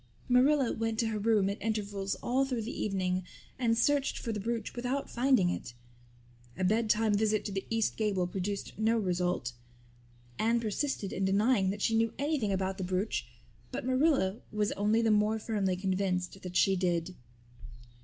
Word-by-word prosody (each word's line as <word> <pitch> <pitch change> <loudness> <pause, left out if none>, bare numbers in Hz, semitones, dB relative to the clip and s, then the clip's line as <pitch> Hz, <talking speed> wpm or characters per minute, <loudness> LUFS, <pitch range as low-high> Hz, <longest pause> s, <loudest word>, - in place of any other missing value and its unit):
Marilla 260 +1 +4
went 225 0 -2
to 225 0 +1
her 215 -1 -2
room 210 -2 +3
at 200 +1 -3
intervals 205 -3 -2
all 260 +3 +2
through 255 -4 -2
the 230 - -4
evening 185 -2 0 0.4
and 230 -2 +2
searched 280 +3 +2
for 230 - -3
the 210 - -3
brooch, 230 +3 -3
without 250 +3 -2
finding 240 -7 +3
it. 120 - -6 0.8
A 185 - -2
bedtime 215 +2 +2
visit 215 0 +1
to 205 - -3
the 195 0 -4
east 225 -1 0
gable 205 -5 +1
produced 195 +2 -4
no 225 +1 +3
result. 180 - -1 0.9
Anne 230 +2 +2
persisted 220 -1 -2
in 195 - -2
denying 200 +1 +3
that 200 +1 -3
she 225 - +2
knew 225 0 +2
anything 280 -7 0
about 190 0 -1
the - - -2
brooch 185 +4 -1 0.4
but - - -4
Marilla 260 -7 +2
was 210 -1 0
only 210 +3 +2
the 225 - +3
more 210 +1 +3
firmly 205 -4 -1
convinced 185 0 -1
that 180 -1 -7
she 195 - +4
did. 175 -1 0
210 Hz, 170 wpm, -31 LUFS, 190-230 Hz, 0.9 s, Marilla